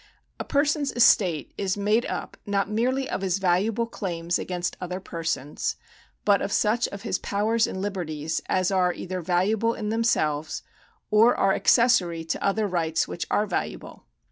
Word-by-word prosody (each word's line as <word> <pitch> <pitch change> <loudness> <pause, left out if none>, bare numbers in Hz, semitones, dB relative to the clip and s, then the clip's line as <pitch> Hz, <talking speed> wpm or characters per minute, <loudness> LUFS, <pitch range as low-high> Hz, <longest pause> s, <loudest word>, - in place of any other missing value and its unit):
A - - -2
person's 290 0 +1
estate 185 - +3
is 195 0 -1
made 210 +4 +1
up - - -5
not 200 -1 +1
merely 255 +5 0
of - - -3
his 190 -1 0
valuable 195 +5 +1
claims 175 -6 -3
against 180 -1 -3
other 180 +1 -4
persons, 165 -6 -3 0.5
but 200 -1 +4
of 200 - -2
such 220 +4 +2
of 200 +1 -9
his 230 - -1
powers 220 +3 +1
and 190 - -4
liberties, 160 -6 -3
as 185 0 +1
are 180 -2 +2
either 185 0 -5
valuable 200 +7 +1
in 210 - -4
themselves, 160 -10 0 0.5
or 220 +3 +5
are 195 0 +3
accessory 185 -9 +3
to 165 - -3
other 210 +2 +1
rights 165 -4 0
which - - -5
are 210 - +2
valuable. 195 - -5
195 Hz, 160 wpm, -25 LUFS, 175-220 Hz, 0.5 s, or